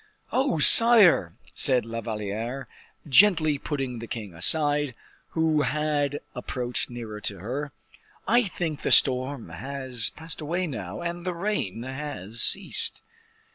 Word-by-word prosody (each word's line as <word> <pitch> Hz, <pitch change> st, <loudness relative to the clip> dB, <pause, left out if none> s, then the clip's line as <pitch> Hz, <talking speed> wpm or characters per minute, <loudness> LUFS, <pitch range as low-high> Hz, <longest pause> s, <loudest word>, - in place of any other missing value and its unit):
"Oh, 260 Hz, -, 0 dB
sire!" 225 Hz, +3 st, +7 dB, 0.2 s
said 130 Hz, -5 st, 0 dB
La 115 Hz, 0 st, -5 dB
Valliere, 110 Hz, +4 st, -5 dB, 0.4 s
gently 155 Hz, -2 st, +4 dB
putting 135 Hz, -5 st, -4 dB
the 115 Hz, -, -8 dB
king 105 Hz, -6 st, -7 dB
aside, 145 Hz, -, 0 dB, 0.4 s
who 160 Hz, -2 st, +2 dB
had 145 Hz, -1 st, -1 dB
approached 125 Hz, 0 st, -2 dB
nearer 115 Hz, -3 st, -8 dB
to -, -, -4 dB
her, 130 Hz, -, -5 dB, 0.6 s
"I 240 Hz, +2 st, +3 dB
think 165 Hz, -5 st, -4 dB
the -, -, -2 dB
storm 130 Hz, -4 st, +2 dB
has 130 Hz, +4 st, -2 dB
passed 160 Hz, 0 st, -2 dB
away 170 Hz, +5 st, -2 dB
now, 105 Hz, -, -6 dB
and 170 Hz, 0 st, -5 dB
the 180 Hz, -1 st, -4 dB
rain 170 Hz, -, -3 dB
has 130 Hz, -6 st, -5 dB
ceased." 195 Hz, 0 st, +3 dB
140 Hz, 130 wpm, -25 LUFS, 115-160 Hz, 0.6 s, sire